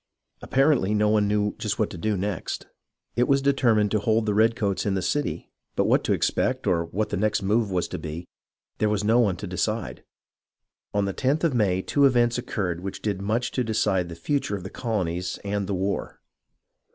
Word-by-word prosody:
Apparently 135 -7 +2
no 105 0 +3
one 105 -1 +3
knew 105 0 +1
just - - -2
what - - 0
to - - -7
do 105 +2 0
next. 100 -1 -3 0.5
It 120 +1 +2
was 140 0 +4
determined 120 -7 +2
to 110 - +2
hold 110 +2 +1
the 105 - +1
redcoats 110 -2 +2
in 100 -2 0
the 95 - 0
city, 145 +9 -2 0.2
but - - +2
what - - +3
to - - +2
expect, - - 0
or 85 -2 +1
what 105 +6 -2
the 105 - -2
next 105 0 +1
move 105 +2 +2
was 90 -2 0
to - - -5
be, 80 +3 -6 0.5
there 105 - +2
was 105 -1 0
no 115 +3 +4
one 105 -6 +3
to - - -6
decide. 105 +3 -3 0.9
On 100 -1 +1
the 100 - -2
lOth 140 +5 +2
of 165 -4 +2
May 95 -6 +1
two 140 -1 +3
events 120 -2 +3
occurred 95 -8 -2
which 95 0 -6
did 100 -3 -1
much 110 +5 -1
to 125 - 0
decide 100 -5 0
the 85 - -7
future 105 - -1
of 95 - -6
the 95 - -7
colonies, 90 -6 -2
and 100 0 -4
of 95 - -4
the 100 - -1
war. 95 +2 -2
105 Hz, 210 wpm, -25 LUFS, 95-115 Hz, 0.9 s, was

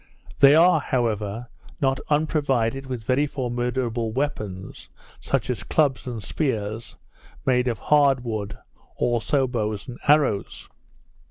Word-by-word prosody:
They 140 +1 +8
are, 170 0 +6
however, 115 -4 -2 0.3
not 135 -1 +1
unprovided 135 -4 0
with 125 -4 -5
very 130 +6 +1
formidable 120 -3 -2
weapons; 110 -8 -4 0.3
such - - -1
as - - -4
clubs 135 -6 +1
and 115 -4 -5
spears, 115 -6 -3 0.5
made 125 -1 +2
of 115 -3 0
hard 140 -1 +3
wood, 110 -4 -4 0.4
also 120 +3 +1
bows 110 -5 -3
and 125 -1 -8
arrows. 140 -9 +2
125 Hz, 115 wpm, -24 LUFS, 110-140 Hz, 0.5 s, They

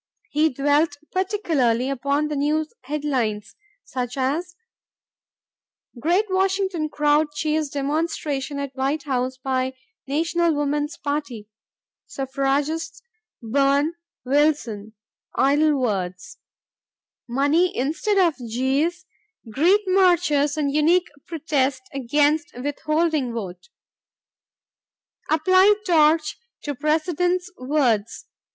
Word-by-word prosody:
He 310 +2 +3
dwelt 290 +3 +1
particularly 325 - 0
upon 280 +3 0
the 300 - -3
news 305 +2 0
headlines, 250 -8 -2 0.3
such 250 0 -5
as, 310 +7 -1 1.4
"Great 350 - +2
Washington 380 -4 0
Crowd 295 +1 +2
Cheers 310 -1 0
Demonstration 285 -1 -2
at 280 -1 -4
White 275 +3 -1
House 260 -2 -2
by 260 0 -2 0.3
National 330 +3 +1
Woman's 295 +1 -1
Party."... 285 -7 -4 0.6
"Suffragists 280 - -2 0.4
Burn 280 +6 +2 0.3
Wilson 255 -7 0 0.4
'Idle 290 +1 +3
Words'.. 185 -7 -3 0.5
." - - -72
"Money 290 +8 +2
Instead 325 - 0
of 350 -4 +4 0.2
Jeers 280 +10 0 0.5
Greet 350 - +4
Marchers 350 -6 +3
and 285 -2 0
Unique 335 +4 +3 0.2
Protest 280 -5 -1
Against 290 +5 +1
Withholding 305 -1 0
Vote"... 185 - -7 1.6
"Apply 370 +6 +5
Torch 315 -3 +3 0.2
to 290 - -3
President's 350 +6 0
Words 250 -6 0
295 Hz, 90 wpm, -23 LUFS, 265-325 Hz, 1.6 s, Apply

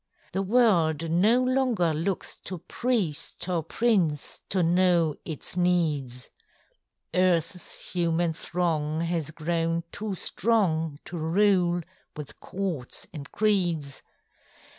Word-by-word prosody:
The 190 - -1
world 175 -8 +3
no 215 +9 +4
longer 255 -10 +2
looks 170 +5 -2
to 185 - -4
priest 180 - -2
Or 175 -3 0
prince 170 -5 0
to 185 -2 +2
know 170 -2 +3
its 160 +2 -6
needs; 155 -9 0 0.8
EarthŌĆÖs 180 -1 0
human 170 -1 +1
throng 160 -2 -1
has 165 -3 -1
grown 165 +1 -1
too 205 -2 -3
strong 170 -8 +1
To 175 - -6
rule 175 +1 +3 0.4
with 150 -2 -8
courts 180 -10 -4
and 145 -2 -8
creeds. 175 -10 +1
175 Hz, 105 wpm, -27 LUFS, 160-190 Hz, 0.8 s, no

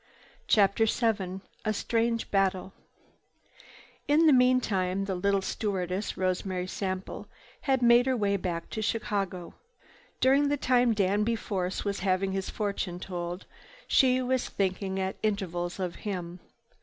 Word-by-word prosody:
CHAPTER 210 +2 +4
VII 200 -5 0 0.2
A 215 - 0
STRANGE 230 +2 -1
BATTLE 195 -1 +1 1.3
In 305 +3 +4
the 305 - +7
meantime 205 -7 +2
the 195 - -2
little 195 +1 +1
stewardess, 190 -1 -2
Rosemary 185 0 -1
Sample, 185 0 -4 0.4
had 265 -2 +3
made 240 +1 +6
her 260 -1 +2
way 200 -2 +1
back 175 -3 -4
to 220 - -3
Chicago. 200 -5 -2 0.7
During 275 +2 +4
the 290 - +1
time 245 -3 +3
Danby 210 +3 +1
Force 190 -4 -3
was 200 -1 -1
having 190 0 +1
his 190 0 -3
fortune 200 -4 -3
told 175 0 -5 0.4
she 255 -1 +4
was 255 0 0
thinking 190 0 -1
at 190 0 -2
intervals 180 -4 -2
of 180 -2 -3
him. 180 -4 -5
195 Hz, 130 wpm, -28 LUFS, 185-230 Hz, 1.3 s, the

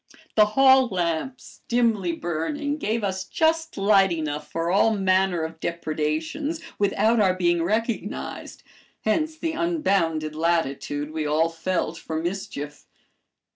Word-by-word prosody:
The 215 -1 +5
hall 265 -1 +7
lamps, 180 +6 -3
dimly 225 -7 +2
burning, 175 - -2
gave 225 -2 -1
us 190 -1 -1
just 320 - 0
light 195 -1 +4
enough 155 -3 -3
for 165 +1 -1
all 215 +3 +4
manner 190 -3 +2
of 160 0 -6
depredations 160 - -2 0.2
without 205 +3 +2
our 190 -3 +3
being 175 -2 +2
recognized, 220 +6 -3 0.4
hence 310 +8 0
the 325 0 -2
unbounded 195 - 0
latitude 155 -3 -1
we 155 -1 -2
all 155 +2 +2
felt 165 0 -2
for 160 0 -4
mischief. 160 -4 -5
185 Hz, 125 wpm, -24 LUFS, 165-230 Hz, 0.4 s, hall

